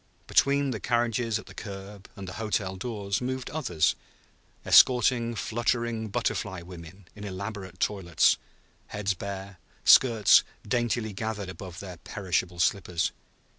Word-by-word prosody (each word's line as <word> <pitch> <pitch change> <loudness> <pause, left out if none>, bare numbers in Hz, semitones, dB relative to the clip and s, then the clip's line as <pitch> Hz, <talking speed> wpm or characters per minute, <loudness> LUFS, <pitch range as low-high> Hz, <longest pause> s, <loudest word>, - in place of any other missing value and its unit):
Between 140 0 +3
the 110 - -3
carriages 120 0 0
at 110 - -9
the - - -13
curb 100 -1 -9
and 100 -3 -8
the 95 - -6
hotel 100 -3 -1
doors 100 0 -3
moved 130 0 -3
others, 120 - +1 0.7
escorting 120 -1 +5
fluttering 115 0 -1
butterfly 95 -2 -2
women 90 +1 -12
in 105 - -10
elaborate 100 -1 -6
toilets, 90 -6 +2 0.5
heads 100 -2 -1
bare, 100 0 -7 0.2
skirts 115 -5 +7 0.3
daintily 120 -3 0
gathered 105 -1 -4
above 90 0 -8
their 90 -3 -8
perishable 90 -1 -2
slippers. 85 0 +1
100 Hz, 125 wpm, -27 LUFS, 95-115 Hz, 0.7 s, skirts